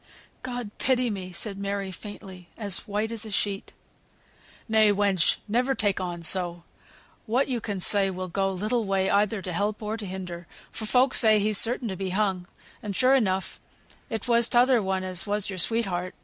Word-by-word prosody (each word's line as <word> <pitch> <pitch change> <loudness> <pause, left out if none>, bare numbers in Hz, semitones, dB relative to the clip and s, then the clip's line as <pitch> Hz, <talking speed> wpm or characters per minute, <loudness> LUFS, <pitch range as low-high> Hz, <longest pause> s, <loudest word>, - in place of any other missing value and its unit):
"God 245 -4 -5
pity 250 -2 +2
me!" 185 -2 -5
said 195 +3 -4
Mary, 200 -1 -3
faintly, 185 -2 -10
as 200 -4 -2
white 210 +2 -2
as 230 -1 -4
a 220 - -7
sheet. 200 -1 -2 1.0
"Nay, 220 -2 +4
wench, 200 -3 +2
never 250 +5 +1
take 205 -5 0
on 175 -2 -4
so. 175 -1 0 0.6
What 245 +5 +2
yo 250 -3 -1
can 205 -3 -4
say 195 +1 +4
will 185 0 -4
go 195 +2 0
little 215 +5 -1
way 195 -1 0
either 205 0 +1
to 180 - -4
help 205 +4 -1
or 215 +1 -3
to 220 - -7
hinder, 180 -2 -7 0.2
for 220 - -5
folk 255 +3 +3
say 220 -2 +6
he's 210 0 +2
certain 240 +1 +3
to 190 - -3
be 190 +1 -3
hung; 190 -2 -1 0.3
and 205 -2 -5
sure 255 +4 +4
enough 190 -8 0 0.5
it 225 0 -4
was 235 -1 +3
t'other 245 0 +4
one 190 -1 -1
as 185 +1 -1
was 205 0 -1
your 185 - -4
sweetheart." 185 -3 -1
205 Hz, 185 wpm, -26 LUFS, 190-225 Hz, 1.0 s, say